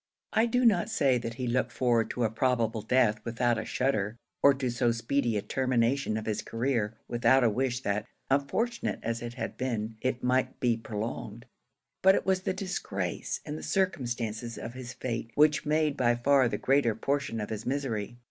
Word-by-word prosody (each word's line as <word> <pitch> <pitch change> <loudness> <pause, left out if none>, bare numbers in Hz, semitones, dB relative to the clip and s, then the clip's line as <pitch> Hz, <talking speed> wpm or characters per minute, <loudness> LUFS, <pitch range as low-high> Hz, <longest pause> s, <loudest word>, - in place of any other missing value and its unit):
I 225 +2 +4
do 250 +2 +2
not 200 -5 +4
say 140 - +2
that 115 -1 -5
he 130 0 -3
looked 125 +1 0
forward 120 -3 +1
to 125 - -2
a 110 - +2
probable 115 -2 +1
death 110 -1 +2
without 120 0 0
a 110 - -4
shudder, 110 -4 0 0.2
or 140 - +7
to 130 -2 -2
so 120 0 +2
speedy 115 0 0
a 100 - -2
termination 130 -2 +1
of 110 - -4
his 110 - -1
career, 115 -3 -1
without 125 +2 +3
a 115 - +4
wish 125 +2 -1
that, 105 0 -1 0.2
unfortunate 180 - 0
as 115 0 -2
it 120 0 -6
had 130 - -5
been, 115 -3 -2
it 130 -1 -1
might 130 +1 +1
be 120 -2 +2
prolonged; 110 0 -5 0.6
but 190 +1 +6
it - - -1
was 190 -1 +2
the 185 - -1
disgrace, 180 - -3
and 80 - -5
the - - -8
circumstances 120 - -2
of 115 - -6
his 130 -1 -7
fate, 120 -2 -4
which 150 0 +4
made 155 -1 +2
by 120 -1 +3
far 130 +1 +4
the - - -2
greater 135 -5 +2
portion 135 -1 -1
of 105 - -4
his 110 0 -5
misery. 120 -5 -2
120 Hz, 190 wpm, -29 LUFS, 115-135 Hz, 0.6 s, or